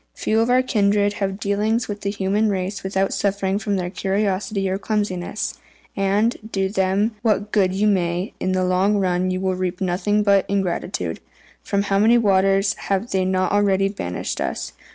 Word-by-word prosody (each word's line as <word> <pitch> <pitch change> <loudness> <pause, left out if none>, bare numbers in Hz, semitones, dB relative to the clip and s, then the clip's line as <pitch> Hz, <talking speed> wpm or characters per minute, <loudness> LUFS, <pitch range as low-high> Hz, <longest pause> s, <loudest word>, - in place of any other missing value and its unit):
Few 220 - 0
of 230 +2 +2
our 255 +1 +4
kindred 205 -3 +2
have 195 - +1
had 195 - -10
dealings 215 +3 0
with 205 -1 -5
the 200 - -1
human 200 +2 0
race 195 0 -2
without 190 0 -1
suffering 200 0 0
from 205 -2 -1
their 180 -2 -2
curiosity 195 0 -1
or 190 +1 -1
clumsiness; 205 -2 -2 0.4
and, 200 +4 +1
do 195 -1 0
them 195 +2 +1
what 210 -2 0
good 190 -3 +3
you 195 +3 0
may, 180 -2 0
in 185 - -1
the 185 0 +1
long 185 +3 +2
run 185 -1 +1
you 185 0 -1
will 190 0 0
reap 180 -1 -3
nothing 195 +3 +1
but 200 -2 +4
ingratitude. 180 - -2 0.4
From 200 0 -1
how 195 -1 +1
many 225 +3 +5
waters 195 -2 +3 0.2
have 200 +4 0
they 190 -1 +1
not 185 0 +1
already 195 -1 +2
banished 90 - -4
us? - - -3
195 Hz, 180 wpm, -22 LUFS, 190-205 Hz, 0.4 s, many